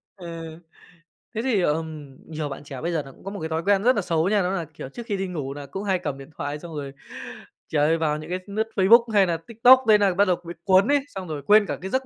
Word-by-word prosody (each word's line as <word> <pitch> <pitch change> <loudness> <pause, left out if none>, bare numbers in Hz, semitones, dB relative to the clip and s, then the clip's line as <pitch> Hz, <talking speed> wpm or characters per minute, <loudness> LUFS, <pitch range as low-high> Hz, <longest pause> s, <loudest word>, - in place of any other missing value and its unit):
Ờ, 175 -4 -9 1.1
thế 220 - -1
thì, 235 -6 +1
ờm, 155 -4 -3
nhiều 155 -2 -4
bạn 135 - -7
trẻ 140 -2 -8
bây 170 - -2
giờ 160 -4 -1
nà 135 - -12
cũng - - -20
có 195 - -6
một 200 - -6
cái 160 - -4
thói 160 +1 -2
quen 200 +1 +2
rất 250 +1 +4
nà 205 - +1
xấu 170 -1 0
nha, 205 -1 +3
đó 180 - 0
nà, 170 - -3
kiểu, 135 - -8
trước 235 +10 -9
khi 205 -3 -2
đi 195 - -2
ngủ 145 -7 -4
đà 145 0 -8
cũng 190 +8 -6
hay 190 -3 0
cầm 145 -6 -4
điện 135 +1 -11
thoại 145 +1 -4
xong 170 -1 -9
rồi, 140 -2 -6 0.8
trời 150 -1 +2
ơi, 165 +1 +2
vào 150 -2 0
những 155 - -9
cái 180 +1 -2
lướt 215 +2 -2
Facebook 225 +5 +6
hay 200 -2 +5
nà 170 -2 -1
TikTok 245 +3 +6
nên 210 -1 +6
nà 195 -2 +3
bắt 200 +3 +3
đầu 185 -2 +2
bị 170 - -6
cuốn 190 +1 +4
ấy, 290 0 +4
xong 190 -8 -8
rồi 150 -3 -5
quên 210 0 +6
cả - - -4
cái 190 - -6
giấc 260 0 0
180 Hz, 290 wpm, -24 LUFS, 155-205 Hz, 1.1 s, Facebook